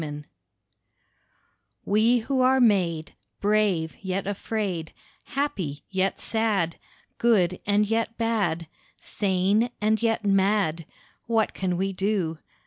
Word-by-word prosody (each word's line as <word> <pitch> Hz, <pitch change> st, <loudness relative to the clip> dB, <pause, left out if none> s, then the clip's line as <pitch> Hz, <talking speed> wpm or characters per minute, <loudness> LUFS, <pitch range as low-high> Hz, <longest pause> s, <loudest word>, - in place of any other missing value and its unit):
WE 150 Hz, -1 st, -6 dB, 1.6 s
We 220 Hz, +4 st, +3 dB
who 260 Hz, +3 st, 0 dB
are 260 Hz, +1 st, +4 dB
made 180 Hz, -9 st, +2 dB, 0.3 s
Brave 205 Hz, -6 st, +1 dB
yet 190 Hz, 0 st, -2 dB
afraid, 200 Hz, -4 st, -3 dB, 0.3 s
Happy 190 Hz, -, -3 dB
yet 190 Hz, 0 st, 0 dB
sad, 210 Hz, -7 st, 0 dB, 0.4 s
Good 185 Hz, -7 st, +3 dB
and 205 Hz, +1 st, +3 dB
yet 225 Hz, +1 st, -1 dB
bad, 205 Hz, -8 st, 0 dB, 0.3 s
Sane 200 Hz, +4 st, +1 dB
and 215 Hz, +1 st, +1 dB
yet 225 Hz, -2 st, 0 dB
mad, 195 Hz, -5 st, +2 dB, 0.4 s
What 225 Hz, -2 st, +1 dB
can 180 Hz, -2 st, -2 dB
we 195 Hz, +1 st, -1 dB
do? 190 Hz, -5 st, -1 dB
200 Hz, 110 wpm, -25 LUFS, 180-220 Hz, 1.6 s, are